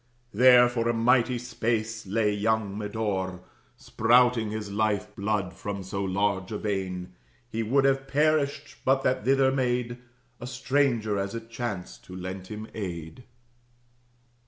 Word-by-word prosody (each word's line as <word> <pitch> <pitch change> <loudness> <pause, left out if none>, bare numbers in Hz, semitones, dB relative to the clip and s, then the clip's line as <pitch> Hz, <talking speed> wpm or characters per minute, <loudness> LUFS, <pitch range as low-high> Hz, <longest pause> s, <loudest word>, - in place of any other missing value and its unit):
There 125 +2 +7
for 120 -1 -1
a 120 - +1
mighty 125 +2 +3
space 115 -2 -2
lay 105 +1 +1
young 105 -1 0
Medore, 100 -3 -3 0.4
Spouting 120 -1 +3
his 105 -1 -5
life 105 0 -1
blood 100 -2 -1
from 100 0 -5
so 100 +1 -3
large 95 0 0
a 105 - -2
vein 95 -3 -3 0.4
He 115 - -2
would 135 +5 +2
have 135 0 +2
perished, 150 0 +1
but 135 +1 +2
that 130 0 +1
thither 135 0 +4
made 125 -2 -1 0.4
A 120 - -7
stranger, 125 -5 +1
as 100 +2 -3
it 115 0 -8
chanced, 115 -7 -5
who 90 - -9
lent 95 0 -6
him 110 0 -6
aid. 85 0 -6
110 Hz, 140 wpm, -27 LUFS, 100-125 Hz, 0.4 s, There